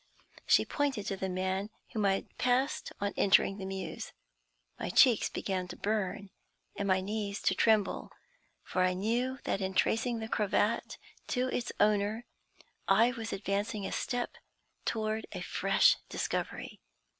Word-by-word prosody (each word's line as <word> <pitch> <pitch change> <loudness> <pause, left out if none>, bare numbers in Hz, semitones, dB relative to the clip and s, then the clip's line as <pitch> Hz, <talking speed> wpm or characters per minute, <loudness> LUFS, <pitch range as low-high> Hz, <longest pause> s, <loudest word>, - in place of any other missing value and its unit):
She - - +5
pointed 275 -8 -1
to 195 - -2
the 190 0 -3
man 190 +2 -1 0.2
whom 215 -3 0
I 195 - +4
had 195 - -5
passed 255 +3 +1
on 200 0 -1
entering 195 0 +4
the 190 - -4
Mews. 190 0 -5 0.7
My - - -3
cheeks 245 -6 +5
began 185 -2 -2
to - - -7
burn 200 -2 -2 0.4
and 200 - -2
my 190 -1 +3
knees 205 0 -3
to - - +3
tremble, 215 0 +2 0.5
for 185 - -1
I 185 0 +3
knew 240 +7 0
that 195 - -1
in 190 0 -2
tracing 230 +1 +2
the 220 0 -4
cravat 210 +1 0 0.3
to 255 0 0
its 245 - -2
owner 210 +2 +2 0.6
I 220 +5 +5
was 230 -2 -5
advancing 200 +1 -2
a - - -3
step 245 -2 -2 0.5
toward 220 0 -1
a - - -5
fresh - - +3
discovery. - - -3
205 Hz, 150 wpm, -31 LUFS, 195-230 Hz, 0.7 s, She